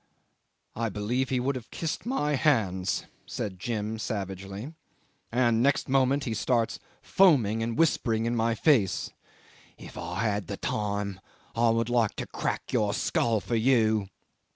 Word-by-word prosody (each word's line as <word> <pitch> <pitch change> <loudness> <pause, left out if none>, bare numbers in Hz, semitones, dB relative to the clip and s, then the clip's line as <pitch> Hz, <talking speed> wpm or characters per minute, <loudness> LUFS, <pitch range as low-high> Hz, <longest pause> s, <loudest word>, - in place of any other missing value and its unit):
'"I 115 0 -1
believe 115 +6 -1
he 130 - +1
would 135 +3 0
have 125 -3 -7
kissed 165 +7 -4
my 150 - 0
hands," 105 - +1 0.2
said 95 -4 -4
Jim 110 0 -3
savagely, 100 - -5 0.6
"and, 120 -1 +2
next 140 +2 +2
moment, 135 +1 +2
he 115 - -2
starts 115 0 0 0.2
foaming 125 - +4
and 115 +1 -2
whispering 120 -8 +2
in 120 +1 0
my 115 0 +1
face, 115 - +2 0.7
'If - - -10
I - - -3
had 105 -4 -1
the - - -4
time 100 -2 -2 0.4
I 115 0 +3
would 115 +1 +1
like 120 -3 +2
to - - -4
crack - - -4
your 105 -2 +1
skull 115 -2 +1
for 120 - -6
you. 110 -4 +3
115 Hz, 150 wpm, -28 LUFS, 105-130 Hz, 0.7 s, foaming